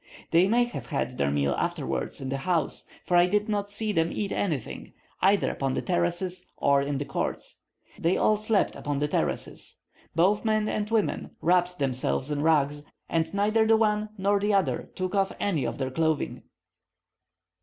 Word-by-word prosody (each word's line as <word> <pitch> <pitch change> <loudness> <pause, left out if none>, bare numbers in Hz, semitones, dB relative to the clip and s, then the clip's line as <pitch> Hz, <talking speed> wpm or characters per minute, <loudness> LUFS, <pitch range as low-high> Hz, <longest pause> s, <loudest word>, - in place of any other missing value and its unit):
They 170 +3 +5
may 240 +4 +4
have 240 - -6
had 130 -5 -3
their 70 - +2
meal 70 0 +1
afterwards - - -2
in 135 - -4
the 135 - -1
house, 160 +1 -1 0.2
for 175 - +1
I 175 0 +6
did 210 +2 +1
not 205 -1 -1
see 210 +1 -2
them 165 -3 +1
eat 200 -2 -3
anything, 155 - -3 0.3
either 195 +2 +3
upon 135 -1 -2
the - - -1
terraces 175 +1 -1
or 140 0 +3
in 140 0 -2
the 145 - -3
courts. 135 - -4 0.4
They 170 +3 +2
all 215 - +3
slept 215 -1 +1
upon 145 -1 -3
the 145 +1 0
terraces. - - -2 0.4
Both 190 +5 +3
men 215 -1 +1
and 210 -1 -2
women 225 -3 -1
wrapped 180 +1 +2
themselves 130 +1 -1
in 145 -1 -1
rugs, 145 -2 +2 0.3
and 165 -1 0
neither 215 +2 +2
the 225 0 +5
one 215 -1 +1
nor 200 +1 +2
the 205 0 +1
other 195 - 0
took 185 0 -3
off 195 -1 +1
any 165 -10 0
of - - -3
their 130 -1 -2
clothing. 160 +1 0
180 Hz, 180 wpm, -27 LUFS, 145-205 Hz, 0.4 s, I